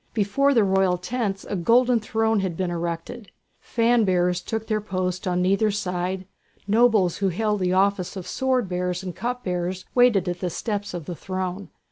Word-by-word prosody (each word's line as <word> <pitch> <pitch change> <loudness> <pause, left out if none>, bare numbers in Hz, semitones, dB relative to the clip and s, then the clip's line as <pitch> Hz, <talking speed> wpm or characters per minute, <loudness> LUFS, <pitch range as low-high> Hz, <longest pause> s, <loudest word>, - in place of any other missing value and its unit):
Before 260 +7 +2
the 225 - +5
royal 190 -2 +2
tents 195 +1 -3
a - - -3
golden 240 +7 +3
throne 220 0 0
had 185 -4 -2
been 185 -2 -1
erected. 170 +6 -4 0.3
Fan 235 0 +2
bearers 180 -2 +1
took 225 0 -4
their 215 -1 -1
post 185 -2 -3
on 180 0 +1
either 195 +3 +3
side, 185 -2 -2 0.4
nobles 215 -5 +3
who 195 -1 +1
held 210 +3 0
the 180 -1 +1
office 190 -1 +1
of 185 -2 -6
sword 255 +2 0
bearers 180 0 -2
and 180 -2 -6
cup 245 +3 -3
bearers 180 0 -3
waited 245 -7 +4
at 175 0 -2
the 180 - -2
steps 205 0 -3
of 170 -4 -6
the 175 - -5
throne. 185 +2 -4
195 Hz, 180 wpm, -24 LUFS, 180-220 Hz, 0.4 s, the